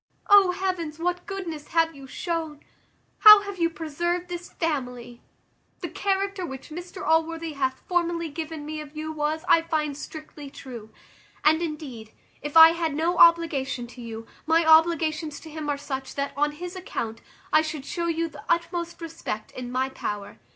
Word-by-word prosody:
O 400 -2 +8
heavens! 360 -4 -2
what 355 +1 -2
goodness 340 -7 -5
have 330 -1 +2
you 275 -2 -12
shown! 320 -1 -4 0.6
How 425 -2 +10
have 400 -2 -7
you 335 0 +3
preserved 345 +3 -3
this 350 0 -6
family! 250 -7 -3 0.6
The - - -4
character 395 -1 -1
which 265 -4 -7
Mr 350 +3 -7
Allworthy 325 0 +1
hath 265 -2 -2
formerly 345 -1 0
given 315 0 -6
me 310 0 -5
of 300 0 -11
you 310 0 -4
was, 310 +1 -2
I 330 - +6
find, 310 -3 -1
strictly 295 -1 -9
true. 245 -6 -10 0.5
And 315 +2 +4
indeed, 285 -9 -6 0.3
if 295 +2 -1
I 320 0 +12
had 330 -3 -2
no 340 +3 0
obligation 295 -7 +4
to 250 - -11
you, 225 -1 -7 0.2
my 325 +1 +4
obligations 320 -1 +3
to 320 - -11
him 305 -1 -5
are 285 - 0
such, 270 -2 -5
that, 280 0 -2
on 295 +1 +1
his 355 +4 -7
account, 230 -11 -5 0.3
I 310 - +7
should 310 -3 -5
shew 340 +3 -2
you 330 0 0
the 320 - -12
utmost 340 0 -1
respect 325 -10 -5
in 245 -1 -7
my 260 +1 0
power. 205 -6 -5
315 Hz, 170 wpm, -25 LUFS, 285-340 Hz, 0.6 s, I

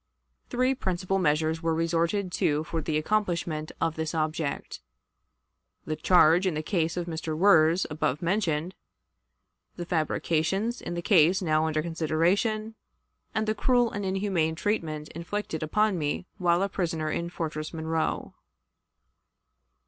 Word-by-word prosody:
Three 255 +2 +2
principal 190 -5 -1
measures 160 -1 +1
were 165 -1 0
resorted 170 +4 0
to 150 -3 +1
for 165 0 -3
the 155 0 -1
accomplishment 170 -4 -1
of 165 -1 0
this 160 +1 -3
object: 155 - -2 1.0
the 155 - -2
charge 175 +2 +5
in 175 - 0
the 155 - -2
case 165 -1 -1
of 175 - -1
Wirz, 165 +1 +3
above 150 -2 -1
mentioned; 170 -2 0 1.0
the 175 - -5
fabrications 170 +6 0
in 175 - -5
the 170 - -4
case 180 -1 +5
now 155 -1 +2
under 155 -1 0
consideration; 175 +7 0 0.6
and 220 - +1
the 215 - +2
cruel 245 0 +2
and 205 - -4
inhuman 190 -4 0
treatment 160 -6 -2
inflicted 170 0 -4
upon 200 +4 +1
me 150 +4 -2
while 175 0 +3
a - - +1
prisoner 165 -5 -2
in 170 +2 -2
Fortress 155 -3 -4
Monroe. 160 0 -2
165 Hz, 135 wpm, -27 LUFS, 155-190 Hz, 1.0 s, charge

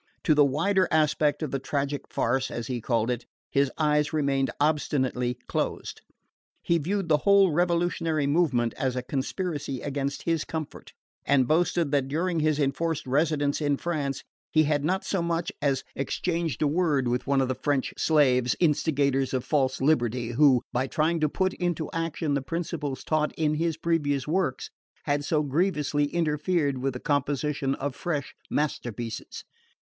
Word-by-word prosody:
To 155 - +4
the 145 -1 +6
wider 185 +8 +2
aspect 155 -1 +2
of 155 - -2
the 135 - -1
"tragic 140 +1 -2
farce," 130 +3 0
as 115 -1 -5
he 125 -2 -3
called 115 0 0
it, 125 0 -3 0.3
his 140 -1 +2
eyes 150 -1 +2
remained 140 -3 +1
obstinately 130 -5 0
closed. - - -3 0.6
He 170 - +2
viewed 190 +4 -1
the 150 - +5
whole 200 +2 +5
revolutionary 170 -2 +1
movement 135 -7 +2
as 130 -2 -1
a 125 - -2
conspiracy 145 0 -3
against 140 0 -3
his 165 -2 0
comfort, 160 -2 -7 0.3
and 130 -3 +3
boasted 170 -1 +2
that 140 -2 +1
during 165 +4 -1
his 155 -1 +1
enforced 155 +3 -1
residence 145 +2 +1
in 145 -1 +1
France 145 -5 -2 0.3
he 155 - +4
had 145 -1 +1
not 185 +5 0
so 195 - -1
much 170 0 -1
as 135 -2 +1
exchanged 165 +3 -2
a - - +3
word 150 -4 +1
with 125 +2 -1
one 140 -1 +3
of 130 - +1
the 130 - -1
"French 135 +1 -1
slaves, 130 -6 +3
instigators 140 -5 +1
of 125 - -1
false 135 -4 0
liberty," 125 -5 +1
who, 130 -1 +4
by 130 +2 0
trying 160 +4 +1
to 155 -1 +2
put 190 +4 0
into 175 -4 -2
action 165 -2 -2
the 140 - +1
principles 155 -3 -4
taught 155 -1 0
in 155 -1 +1
his 165 0 -1
previous 150 -5 0
works, 165 -5 -1 0.3
had 145 -1 0
so 150 0 +1
grievously 150 -1 +1
interfered 150 -1 0
with 135 +1 -1
the 125 - -6
composition 145 -1 0
of 140 -1 -4
fresh 145 -6 -3 0.2
masterpieces. 120 -6 -3
145 Hz, 160 wpm, -27 LUFS, 135-165 Hz, 0.6 s, the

